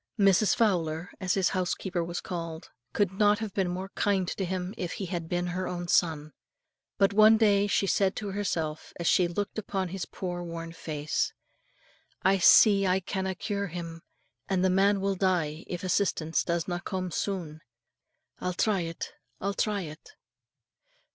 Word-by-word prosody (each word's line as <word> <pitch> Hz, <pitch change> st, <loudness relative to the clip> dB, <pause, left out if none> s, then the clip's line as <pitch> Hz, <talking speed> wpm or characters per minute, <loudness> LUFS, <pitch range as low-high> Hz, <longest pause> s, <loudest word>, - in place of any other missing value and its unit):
Mrs. 200 Hz, -1 st, +4 dB
Fowler, 175 Hz, -5 st, 0 dB
as 185 Hz, -2 st, 0 dB
his 190 Hz, -3 st, +2 dB
housekeeper 180 Hz, -1 st, -1 dB
was 170 Hz, +1 st, -4 dB
called, 165 Hz, -3 st, -6 dB, 0.2 s
could 200 Hz, -3 st, +1 dB
not 205 Hz, +1 st, +4 dB
have 215 Hz, -3 st, -5 dB
been 190 Hz, -3 st, 0 dB
more 185 Hz, +2 st, -4 dB
kind 195 Hz, -2 st, 0 dB
to 195 Hz, -, -3 dB
him 185 Hz, +1 st, -3 dB
if 180 Hz, -2 st, -4 dB
he 195 Hz, -, -4 dB
had 170 Hz, -2 st, -4 dB
been 175 Hz, 0 st, 0 dB
her 185 Hz, +1 st, -2 dB
own 175 Hz, -1 st, -4 dB
son. 155 Hz, -3 st, +1 dB, 0.6 s
But 195 Hz, 0 st, +3 dB
one 215 Hz, +1 st, +7 dB
day 205 Hz, -2 st, +4 dB
she 200 Hz, -, +2 dB
said 195 Hz, 0 st, +2 dB
to 205 Hz, -2 st, -4 dB
herself, 165 Hz, -6 st, -3 dB
as 170 Hz, -, -3 dB
she 180 Hz, +1 st, +4 dB
looked 205 Hz, +5 st, -3 dB
upon 195 Hz, -3 st, -3 dB
his 190 Hz, +1 st, -5 dB
poor 175 Hz, -2 st, -5 dB
worn 165 Hz, -1 st, -6 dB
face, 155 Hz, -2 st, -2 dB, 0.9 s
"I 195 Hz, +1 st, +4 dB
see 195 Hz, +2 st, +7 dB
I 185 Hz, +1 st, +3 dB
canna 190 Hz, 0 st, -3 dB
cure 200 Hz, +1 st, -2 dB
him, 165 Hz, -1 st, -7 dB, 0.5 s
and 190 Hz, -1 st, +2 dB
the 185 Hz, -, +3 dB
man 195 Hz, +1 st, +3 dB
will 195 Hz, 0 st, +1 dB
die 175 Hz, -5 st, 0 dB
if 175 Hz, 0 st, -5 dB
assistance 175 Hz, -4 st, +1 dB
doesna 170 Hz, +1 st, -1 dB
come 185 Hz, -2 st, -3 dB
soon. 165 Hz, -5 st, -3 dB, 0.8 s
I'll 180 Hz, -1 st, -2 dB
try 205 Hz, +1 st, +2 dB
it, 165 Hz, -1 st, -5 dB, 0.3 s
I'll 200 Hz, +1 st, -1 dB
try 205 Hz, 0 st, 0 dB
it." 155 Hz, -, -10 dB
185 Hz, 165 wpm, -28 LUFS, 170-195 Hz, 0.9 s, one